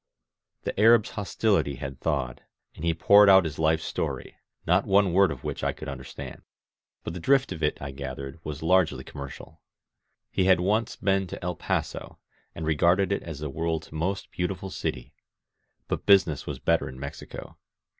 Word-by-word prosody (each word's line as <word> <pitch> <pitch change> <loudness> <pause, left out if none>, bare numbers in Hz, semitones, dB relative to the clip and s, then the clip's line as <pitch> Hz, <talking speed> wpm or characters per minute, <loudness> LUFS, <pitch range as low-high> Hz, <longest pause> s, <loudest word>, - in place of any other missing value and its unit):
The - - -4
Arab's 115 +1 +5
hostility 100 - 0
had 65 0 -7
thawed, 65 -6 -2 0.3
and - - -11
he 85 - +2
poured 100 +5 +6
out 95 -1 +8
his 75 -2 -5
life's 80 0 +2
story, - - -4 0.3
not 90 +4 +2
one 100 -2 +4
word 95 0 +5
of - - -6
which - - -4
I - - +1
could 75 - -9
understand. 65 -2 -8 0.6
But 80 - -5
the 90 - -5
drift 135 +7 +3
of 80 -4 -5
it, 75 - 0
I 70 0 -6
gathered, 70 +2 -7
was 75 0 -6
largely 90 0 +2
commercial. 70 -1 -10 0.7
He 95 - +1
had 95 -2 +5
once 105 +5 0
been 95 0 +1
to - - -8
El 90 0 -2
Paso - - -3 0.4
and 80 - -5
regarded 85 +5 +3
it 100 - 0
as 80 -3 -8
the 75 - -3
world's 80 +1 -3
most 90 +5 -3
beautiful 90 +1 -3
city. 65 -8 -4 0.7
But - - -3
business 95 -7 +4
was - - -4
better - - +1
in 65 0 -10
Mexico. 70 +1 -8
85 Hz, 175 wpm, -27 LUFS, 75-95 Hz, 0.7 s, out